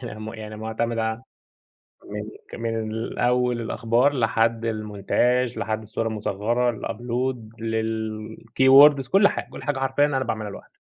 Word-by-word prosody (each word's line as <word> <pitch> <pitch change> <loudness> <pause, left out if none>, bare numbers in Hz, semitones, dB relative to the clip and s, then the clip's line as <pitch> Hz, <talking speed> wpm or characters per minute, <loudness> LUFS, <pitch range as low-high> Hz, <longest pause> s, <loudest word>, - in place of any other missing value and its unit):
م 110 -1 -6
يعني 110 -1 -8
معتمد 110 +1 -2
عل 110 +2 -1 0.8
من 105 +2 -8
من 115 0 -3
أوّل 125 -1 +2
الأخبار 115 +4 +1
لحد 115 -2 +1
المونتاچ 115 +3 0
لحد 110 0 -2
الصورة 110 +1 -3
المصغرة، 110 +3 0
الupload، 120 +3 -2 0.2
للkeywords 115 +5 +3
كل 200 +1 +6
حاجة، - - -5
كل - - -9
حاجة 145 -3 -1
حرفيًا 135 +2 +2
أنا 135 -2 -1
باعملها 110 -1 -3
لوحدي. - - -12
115 Hz, 125 wpm, -24 LUFS, 110-125 Hz, 0.8 s, كل